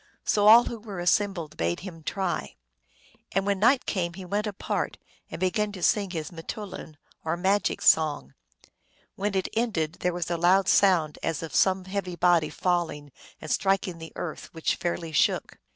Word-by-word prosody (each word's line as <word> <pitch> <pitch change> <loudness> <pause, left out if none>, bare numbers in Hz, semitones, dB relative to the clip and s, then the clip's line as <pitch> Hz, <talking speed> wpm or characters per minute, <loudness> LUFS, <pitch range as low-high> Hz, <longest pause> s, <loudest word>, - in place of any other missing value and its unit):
So 205 0 +3
all 230 +3 +9
who 235 - -5
were 205 -4 -8
assembled 175 -3 0
bade 85 +1 -1
him 175 -4 -9
try. 175 - -3 0.8
And 195 +1 +1
when 200 -1 0
night 250 +6 +4
came 170 -4 -2
he 190 0 -8
went 205 +4 -1
apart, 205 -2 -3 0.3
and - - -7
began 205 +3 0
to 185 -3 -7
sing 205 -4 +2
his 160 -3 -5
m 170 - -14
teoulin, 180 -4 -7 0.3
or 160 +1 -1
magic 195 +2 +1
song. 150 - +3 0.8
When 200 0 -2
it 190 - 0
ended 190 -9 -1
there 180 - 0
was 175 -1 -4
a 170 - 0
loud 185 +3 +4
sound 175 -7 +3
as 165 -1 -2
of 160 - -7
some 190 -1 +2
heavy 190 -2 -4
body 175 -3 +3
falling 165 -5 -2 0.3
and 155 - -6
striking 190 -3 0
the 160 0 -9
earth, 160 - -6
which 160 - 0
fairly 170 -2 -3
shook. 150 - +1
180 Hz, 175 wpm, -26 LUFS, 165-200 Hz, 0.8 s, all